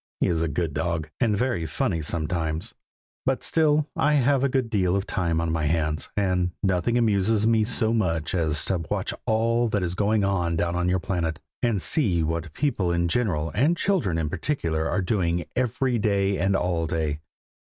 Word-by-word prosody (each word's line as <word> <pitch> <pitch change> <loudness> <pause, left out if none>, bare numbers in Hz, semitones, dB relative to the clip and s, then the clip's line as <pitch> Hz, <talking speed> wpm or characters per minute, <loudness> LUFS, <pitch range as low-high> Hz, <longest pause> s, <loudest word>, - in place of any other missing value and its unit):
He - - +2
is 80 -2 0
a 85 - +1
good 80 0 -2
dog, 80 -2 -2
and 110 -5 +2
very 115 -9 -1
funny 80 +2 -1
sometimes, 80 +1 -2 0.5
but - - -1
still 155 -2 +2
I 150 - +2
have 140 0 +3
a 140 - +2
good 130 -2 0
deal 95 -3 +2
of 100 0 -1
time 85 -4 -1
on 85 -1 -1
my 80 -1 -1
hands, 75 -1 -1
and 90 -3 +1
nothing 95 +5 +1
amuses 110 -1 +2
me 115 -1 +3
so 115 -1 +3
much 85 -7 0
as 80 -5 +1
to 95 - 0
watch - - -1
all 115 +2 +2
that 100 -3 -1
is 90 -1 -1
going 105 +2 +1
on 90 -4 0
down 85 +1 -1
on 90 0 0
your 95 - +2
planet, 85 -4 -2 0.2
and 115 -5 +1
see 90 - +2
what 80 +1 -3
people 110 - 0
in 85 0 +1
general, 85 -7 0
and 145 - +2
children 165 - 0
in 80 -2 -1
particular, 80 - -2
are 95 +1 0
doing, 90 -4 0
every 125 0 0
day 100 -2 +1
and 95 +2 +2
all 85 -3 0
day. 80 -3 -2
90 Hz, 190 wpm, -25 LUFS, 80-115 Hz, 0.5 s, have